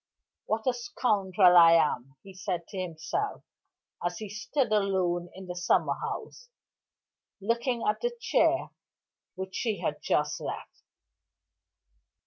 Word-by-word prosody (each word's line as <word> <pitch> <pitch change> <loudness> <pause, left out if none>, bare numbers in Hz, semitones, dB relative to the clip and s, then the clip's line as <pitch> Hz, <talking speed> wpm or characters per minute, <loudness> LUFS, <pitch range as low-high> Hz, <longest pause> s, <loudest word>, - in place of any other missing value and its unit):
"What 220 0 -1
a 255 - +3
scoundrel 200 -6 +3
I 165 -1 +9
am!" 135 -5 +2
he 195 - -12
said 180 -2 -4
to 195 - -5
himself 175 - -3 0.6
as 175 0 -1
he 215 -2 -6
stood 235 +5 -1
alone 185 -4 +1
in 190 0 -9
the 180 -1 -6
summer 175 +1 +2
house, - - -6 0.9
looking 235 +3 0
at 210 - +1
the 485 - 0
chair - - +2 0.6
which 190 0 -6
she 220 -4 -1
had - - -2
just - - 0
left. - - -6
190 Hz, 125 wpm, -29 LUFS, 175-230 Hz, 0.9 s, I